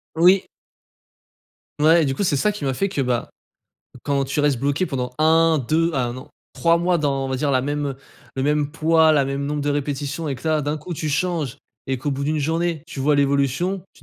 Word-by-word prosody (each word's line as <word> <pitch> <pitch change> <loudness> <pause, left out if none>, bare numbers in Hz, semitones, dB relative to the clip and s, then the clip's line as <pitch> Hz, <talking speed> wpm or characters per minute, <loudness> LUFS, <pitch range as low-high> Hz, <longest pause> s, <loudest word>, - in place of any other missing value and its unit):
Oui. 180 +4 +4 1.3
Mouais 160 +3 +5
et - - +2
du 135 -1 -1
coup, 200 - -1
c'est 155 -7 +1
ça 210 +9 +2
qui 205 -8 -6
m'a 135 - 0
fait 195 +10 -1
que, 165 -7 -2
bah, 125 -2 -1 0.8
quand 140 -1 +1
tu 135 +2 -4
restes 145 -4 +2
bloqué 145 +6 0
pendant 125 -4 -3
1-2, 160 0 +3
à 135 -4 0
1 120 +1 -4
an, 130 - -10 0.2
3 170 0 +2
mois 175 0 +1
dans, 140 -3 0
on - - -3
va 130 - -2
dire, 140 +2 0
la 130 -2 +2
même, 145 +2 -2
heu, 135 -2 -4 0.4
le 130 - -1
même 150 0 +1
poids, 160 0 +3
la 145 -3 +3
même 140 +1 -3
nombre 145 +1 -2
de 145 0 -1
répétitions, 145 +2 -3
et 135 - -2
que 160 - -9
là 155 -1 +1
d'un 145 +2 -1
coup 170 +4 -6
tu 155 - -3
changes, 150 -3 -1 0.3
et 130 -1 -1
qu'au 145 +3 -2
bout 135 +1 -4
d'une 155 +2 0
journée, 165 +1 -1
tu 145 - -7
vois 145 +2 +3
l'évolution, 140 +7 +1
tu - - -22
145 Hz, 230 wpm, -22 LUFS, 135-160 Hz, 1.3 s, Mouais